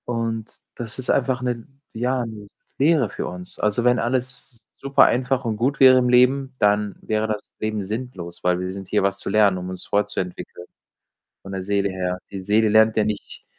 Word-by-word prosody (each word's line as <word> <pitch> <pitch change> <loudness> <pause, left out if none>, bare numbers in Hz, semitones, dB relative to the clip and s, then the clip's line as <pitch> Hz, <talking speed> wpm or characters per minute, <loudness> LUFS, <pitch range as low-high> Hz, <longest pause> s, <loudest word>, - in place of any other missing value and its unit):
Und 115 -2 -3 0.2
das 120 +1 -7
ist 130 - -5
einfach 130 -1 +1
'ne 120 -2 -3 0.3
ja, 125 +2 -1
'ne 110 -2 -8
s 100 - -19
Lehre 145 -5 +3
für - - -5
uns. 90 0 -9
Also, 105 +3 +1
wenn 125 0 +3
alles 125 0 -3
super 140 0 +3
einfach 130 +1 +1
und 110 -2 -1
gut 130 +5 0
wäre 130 -1 +8
im 125 -1 +1
Leben, 130 +2 +3
dann 105 -1 +2
wäre 110 0 -1
das 105 -1 -5
Leben 110 -1 -2
sinnlos, 105 -5 -6
weil 90 0 +2
wir 90 0 -3
sind 95 0 -8
hier, 105 - +1
was 100 0 0
zu - - -4
lernen, 100 -2 +4
um 90 0 -6
uns 95 -1 -6
fortzuentwickeln, 90 -3 -3 0.8
von 95 - -9
der 95 -1 -3
Seele 100 +1 0
her. 90 -1 -2
Die 100 - -5
Seele 105 +3 +2
lernt 110 +1 +4
ja 110 - +4
nicht 105 -1 -5
110 Hz, 200 wpm, -22 LUFS, 100-125 Hz, 0.8 s, wäre